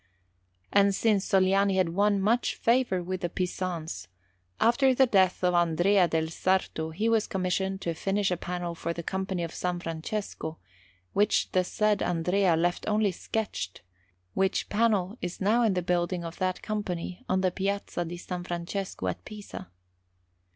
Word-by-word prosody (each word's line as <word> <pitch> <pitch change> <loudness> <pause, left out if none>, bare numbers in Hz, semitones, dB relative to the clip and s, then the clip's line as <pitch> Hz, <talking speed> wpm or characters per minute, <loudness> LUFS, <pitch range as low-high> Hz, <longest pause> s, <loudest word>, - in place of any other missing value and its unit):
And 200 -1 +5
since 205 -2 +2
Sogliani 195 0 +3
had 185 -3 +2
won 200 +3 +2
much 225 +5 +1
favour 235 -6 +2
with 185 +1 -4
the 175 - -1
Pisans, 170 - -3 0.5
after 260 +3 +4
the 265 - +6
death 190 -6 +3
of 180 0 +3
Andrea 175 +3 +4
del 160 -1 0
Sarto 165 -2 0
he 200 +8 -1
was 225 -2 +2
commissioned 190 +1 -1
to 170 - -1
finish 195 +3 0
a - - +2
panel 175 0 -4
for 170 0 -3
the 170 - -6
Company 190 0 -2
of 165 - -4
S. - - -8
Francesco, 175 -1 -3 0.6
which 205 +1 +2
the 185 - +3
said 210 +2 +1
Andrea 180 +1 +2
left 175 +2 0
only 210 -1 +2
sketched; 180 - -4 0.5
which 190 0 0
panel 210 -1 +1
is 175 0 -4
now 215 +5 +3
in 220 -5 +3
the 180 - 0
building 175 0 0
of 165 0 -7
that 185 -1 -1
Company 185 -4 -4
on 185 0 +2
the 185 -1 +2
Piazza 195 -1 -2
di 170 +1 -6
S. 175 - -11
Francesco 175 - -4
at 90 - -3
Pisa. 210 - -9
185 Hz, 160 wpm, -28 LUFS, 175-200 Hz, 0.6 s, the